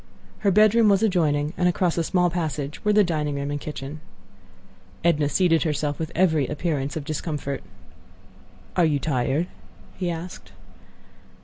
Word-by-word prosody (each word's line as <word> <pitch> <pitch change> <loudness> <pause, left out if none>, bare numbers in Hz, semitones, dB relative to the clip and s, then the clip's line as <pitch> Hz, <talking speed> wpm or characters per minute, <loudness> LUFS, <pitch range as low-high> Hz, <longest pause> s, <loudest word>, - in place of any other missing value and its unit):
Her 205 - +2
bedroom 215 +3 +5
was 200 +2 +3
adjoining, 155 -7 +1
and 180 0 +3
across 175 -1 +1
a 170 - 0
small 180 +1 +2
passage 150 -4 -3
were 210 - +3
the 210 0 +5
dining 150 -5 -1
room 140 0 -3
and 145 0 -3
kitchen. 150 0 -6 1.0
Edna 150 -4 +2
seated 165 -2 +3
herself 150 -1 -1
with 160 0 -3
every 160 -7 +3
appearance 145 -3 -2
of 155 - -4
discomfort. 150 -3 -3 1.1
"Are 180 - +4
you 155 -3 +3
tired?" 140 +2 0 0.5
he 180 -2 -2
asked. 170 +2 -7
160 Hz, 145 wpm, -24 LUFS, 145-180 Hz, 1.1 s, bedroom